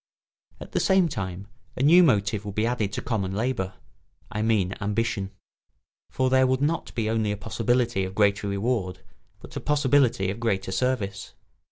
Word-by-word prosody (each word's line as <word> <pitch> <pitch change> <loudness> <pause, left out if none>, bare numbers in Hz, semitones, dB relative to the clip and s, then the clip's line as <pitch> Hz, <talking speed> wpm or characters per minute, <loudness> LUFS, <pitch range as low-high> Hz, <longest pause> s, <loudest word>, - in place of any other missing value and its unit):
At - - -10
the - - 0
same 190 -2 +3
time 95 - -5 0.3
a 130 - 0
new 170 +5 +7
motive 105 - +2
would 100 -1 -7
be 110 - +1
added 115 -4 -1
to - - -4
common 100 -8 -2
labour, 105 -5 -2 0.6
I 105 - -2
mean 105 -4 +1
ambition. 105 -1 -1 0.8
For 130 -1 0
there 130 0 +5
would 130 0 +1
be - - +3
not 165 +3 -2
only 110 -1 0
a 105 - -3
possibility 115 0 0
of 95 +1 -5
greater 100 -1 +2
reward 100 -1 -2 0.4
but - - -12
a - - -2
possibility 135 -9 +2
of 100 - -7
greater 100 -5 -1
service. 100 -4 -2
110 Hz, 170 wpm, -25 LUFS, 100-130 Hz, 0.8 s, new